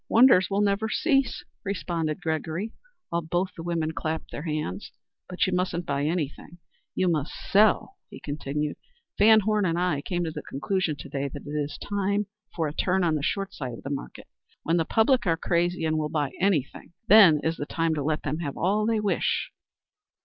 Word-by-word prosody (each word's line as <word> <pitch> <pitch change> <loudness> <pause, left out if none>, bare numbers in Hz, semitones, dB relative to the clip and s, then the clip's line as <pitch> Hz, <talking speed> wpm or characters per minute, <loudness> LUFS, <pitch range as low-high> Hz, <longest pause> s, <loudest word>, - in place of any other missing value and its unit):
Wonders 230 -5 +6
will 200 +1 +1
never 205 +2 +1
cease," 275 -1 +1 0.2
responded 170 -6 -2
Gregory, 160 +6 -2 0.4
while 170 0 0
both 175 +3 -1
the 165 - -7
women 165 -2 -1
clapped 160 0 -4
their - - -5
hands. 150 - -4 0.4
"But 180 - +1
you 185 - -1
musn't 180 -1 -1
buy 140 0 -1
anything; 160 0 -3 0.4
you 185 - +1
must 155 -3 0 0.2
sell," 215 - +4
he - - -10
continued. 150 0 -3 0.4
"VanHorne 215 -2 +5
and 165 - -1
I 180 -3 +1
both 140 - -7
came 175 -1 -1
to 165 - -2
the 150 -1 -6
conclusion 160 +4 -1
to 140 - -9
day 140 0 -2
that 140 +1 -9
it - - -8
is 150 -1 -3
time 200 0 -1 0.3
for 160 -3 0
a 145 - -5
turn 185 +3 +1
on 165 -2 +2
the 150 - 0
short 195 +6 -2
side 130 -4 -5
of - - -10
the 140 - -5
market. 140 - -6 0.4
When 165 +2 +1
the 165 - +1
public 225 - +3
are 165 -1 +2
crazy 170 0 0
and 155 0 +1
will 150 -1 -1
buy 150 -3 -1
any 185 -7 +3
thing, 140 - -15
then 200 -9 +8
is 160 +1 0
the 145 - -4
time 165 -1 0
to 150 - -2
let 155 +2 -1
them 150 +3 -2
have 145 -5 -4
all 210 +4 +1
they 225 -1 +2
wish." 210 -1 0
170 Hz, 200 wpm, -26 LUFS, 150-195 Hz, 0.4 s, then